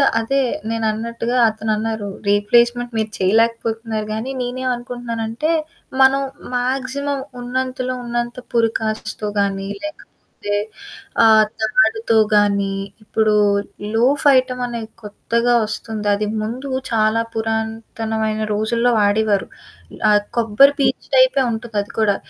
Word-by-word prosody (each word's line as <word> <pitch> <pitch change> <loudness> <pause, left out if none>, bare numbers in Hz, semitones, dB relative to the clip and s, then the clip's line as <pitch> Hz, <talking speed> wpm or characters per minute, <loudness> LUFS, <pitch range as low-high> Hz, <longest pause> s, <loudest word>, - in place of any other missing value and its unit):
The - - +5 0.2
అదే 275 +5 0 0.3
నేనన్నట్టుగా 230 +2 -1
అతనన్నారు. 220 -1 -2 0.2
"Replacement 235 +4 +3
మీరు 220 0 -1
చేయలేకపోతున్నారు 225 +1 0
గానీ, 230 +5 -4
నేనేమనుకుంటున్నానంటే, 245 +1 -3 0.5
మనం 270 +1 +5 0.3
మాక్సిమం 270 +2 -1 0.2
ఉన్నంతలో 255 0 -2
ఉన్నంత 240 0 -2 0.2
పురికాట్స్‌తో 220 -2 -1
గానీ 195 -1 -1
లేకపోతే 305 0 -7 1.2
ఆహ్, 220 -1 +7 0.2
తాడుతో 220 +1 +2 0.2
గానీ" 200 -1 +2 0.3
ఇప్పుడు 215 0 +1 0.6
లోఫ్ 265 +6 +2
ఐటమ్ 255 -1 0
అనేది 230 -2 -5
కొత్తగా 235 +3 -1
ఒస్తుంది. 215 -1 -5
అది 210 +1 -1 0.2
ముందు 245 +6 -5 0.2
చాలా 220 0 +2
పురాతనమైన 220 0 -2
రోజుల్లో 230 +3 +1
వాడేవారు. 205 -1 +2 0.6
ఆహ్, 205 0 +4 0.2
కొబ్బరి 235 +6 +5
పీచు - - 0
టైపే - - +5
ఉంటుందది 220 -2 -3
కూడా. 205 -2 +3
225 Hz, 100 wpm, -19 LUFS, 215-245 Hz, 1.2 s, ఆహ్